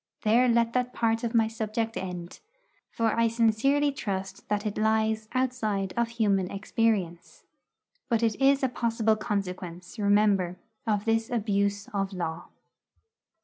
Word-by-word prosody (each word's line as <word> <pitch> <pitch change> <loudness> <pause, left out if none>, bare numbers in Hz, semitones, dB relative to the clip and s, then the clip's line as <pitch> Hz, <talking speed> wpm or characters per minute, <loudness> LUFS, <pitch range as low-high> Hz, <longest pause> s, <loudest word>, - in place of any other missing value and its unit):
There 235 +4 +4
let 235 0 +2
that 250 0 0
part 225 0 +1
of 235 0 -2
my 225 -1 +4
subject 225 0 -3
end; 180 -2 -6 0.5
for 225 -1 0
I 230 0 +3
sincerely 235 +6 +2
trust 195 -7 -5
that 210 +1 -1
it 210 -1 -2
lies 220 0 +1
outside 220 -7 -1
of 235 0 +1
human 195 -5 +2
experience. 200 -4 -1 0.7
But 230 -1 +1
it 225 -2 +2
is 275 +1 +4
a - - +4
possible 230 -2 +1
consequence, 185 -3 -4
remember, 200 -3 +2 0.3
of 210 -2 0
this 225 0 +1
abuse 200 -3 0
of 195 -1 -2
law. 165 -3 -4
220 Hz, 140 wpm, -27 LUFS, 200-230 Hz, 0.7 s, There